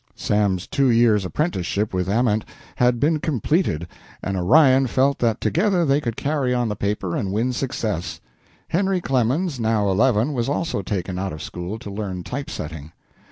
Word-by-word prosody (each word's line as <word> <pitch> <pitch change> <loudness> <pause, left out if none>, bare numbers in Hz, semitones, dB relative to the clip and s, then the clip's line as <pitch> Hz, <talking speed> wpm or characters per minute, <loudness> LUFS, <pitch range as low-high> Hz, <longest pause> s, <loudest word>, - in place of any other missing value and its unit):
Sam's 100 -3 0
two 135 -2 +1
years' 115 -4 +4
apprenticeship 105 - -1
with 90 0 -1
Ament 110 0 +2 0.3
had 125 -1 +3
been 155 +4 +2
completed, 145 - 0 0.4
and 95 - -2
Orion 130 - +5
felt 135 +3 +1
that 115 -1 +1
together 180 -1 +1
they 140 0 +2
could 115 -5 -3
carry 140 -4 0
on 120 -2 0
the 105 - -2
paper 100 -3 -2
and 95 - -2
win 115 +5 0
success. 110 -9 -3 0.5
Henry 190 +1 +1
Clemens, 135 +2 0
now 110 -3 +1
eleven, 115 +6 +2
was 120 -1 -1
also 160 -4 -1
taken 90 -1 -3
out 95 -2 -3
of 75 - -7
school 90 +5 -5
to 105 -3 -8
learn 100 -3 -4
type 140 - -5
setting. 80 - -7
115 Hz, 165 wpm, -22 LUFS, 95-140 Hz, 0.5 s, Orion